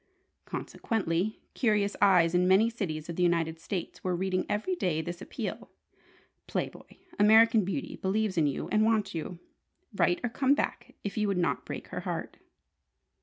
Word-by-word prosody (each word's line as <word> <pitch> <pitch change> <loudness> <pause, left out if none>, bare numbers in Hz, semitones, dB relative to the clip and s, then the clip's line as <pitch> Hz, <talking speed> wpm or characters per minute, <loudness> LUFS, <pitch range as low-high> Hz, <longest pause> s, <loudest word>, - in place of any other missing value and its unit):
Consequently, 200 -1 -2
curious 210 -4 +1
eyes 180 -4 +5
in 180 +1 +3
many 205 +5 +5
cities 160 -9 -4
of 170 - -6
the - - 0
United 165 -2 +1
States 180 +1 -5
were 185 -1 0
reading 185 +1 -1
every 210 - -1
day 175 - 0
this 175 +2 -5
appeal: - - -5 0.8
"Play - - -1
Boy: - - -16 0.2
'American 220 +1 +6
Beauty' 275 +10 -4
believes 200 +1 0
in 160 -3 +3
you 140 - -3
and 215 0 +3
wants 215 -3 +1
you. 170 +2 -5 0.6
Write 355 - +2
or 245 - 0
come 270 +3 +3
back - - -3
if 205 - -4
you 210 -1 +1
would 200 -2 0
not 175 -1 0
break - - -6
her - - -4
heart." - - -5
195 Hz, 170 wpm, -29 LUFS, 175-220 Hz, 0.8 s, American